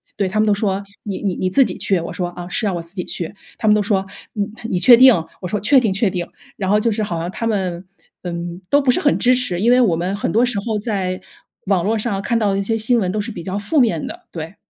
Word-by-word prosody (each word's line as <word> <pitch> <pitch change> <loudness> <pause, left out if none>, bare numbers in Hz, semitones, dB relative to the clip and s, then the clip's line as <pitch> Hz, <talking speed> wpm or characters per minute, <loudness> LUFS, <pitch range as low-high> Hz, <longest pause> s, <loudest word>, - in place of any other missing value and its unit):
对。 195 - 0
他 215 +2 -1
们 215 - +3
都 210 - +4
说： 200 -1 -1 0.2
“你 200 -3 -5
你 195 -4 -1
你 185 - -1
自 270 +6 +4
己 185 - -4
去？” 190 -3 +1
我 165 - -6
说： 180 -2 -3
“啊， 175 0 -8
是 215 +5 -2
啊， - - +1
我 170 - -3
自 170 +2 -12
己 180 - -3
去。” 170 +1 -5 0.3
他 220 - -1
们 210 - +6
都 210 - +2
说： 195 -2 0 0.3
“你 205 -2 -1 0.2
你 180 - 0
确 240 +6 +8
定？” 260 +1 +8 0.3
我 180 - -4
说： 205 +3 -2
“确 275 +6 +4
定 225 -5 0
确 200 +1 +1
定。” 175 -2 -3 0.3
然 190 -2 -2
后 210 - +4
就 230 +2 +1
是 215 0 -1
好 170 -5 -3
像 170 +2 -3
他 230 - -4
们， 190 -5 -2 0.4
嗯， 175 +1 -5
都 285 0 +4
不 265 - 0
是 - - +1
很 290 - +3
支 250 0 +4
持， 215 -9 -1
因 225 - +2
为 250 - +5
我 185 -9 +3
们 180 +4 -2
很 200 - -2
多 230 +3 +3
时 245 -4 -2
候 220 -2 -1
在 190 -4 -2 0.5
网 190 -4 +2
络 225 +2 +1
上 205 -3 -2
看 230 +2 0
到 200 -2 +1
一 - - 0
些 225 +3 0
新 230 +2 +3
闻 185 -3 0
都 210 +1 -1
是 230 +2 -5
比 175 - -7
较 190 +2 -3
负 240 +9 0
面 180 - +2
的， - - -9
对。 165 +3 -6
200 Hz, 305 characters per minute, -19 LUFS, 180-225 Hz, 0.5 s, 确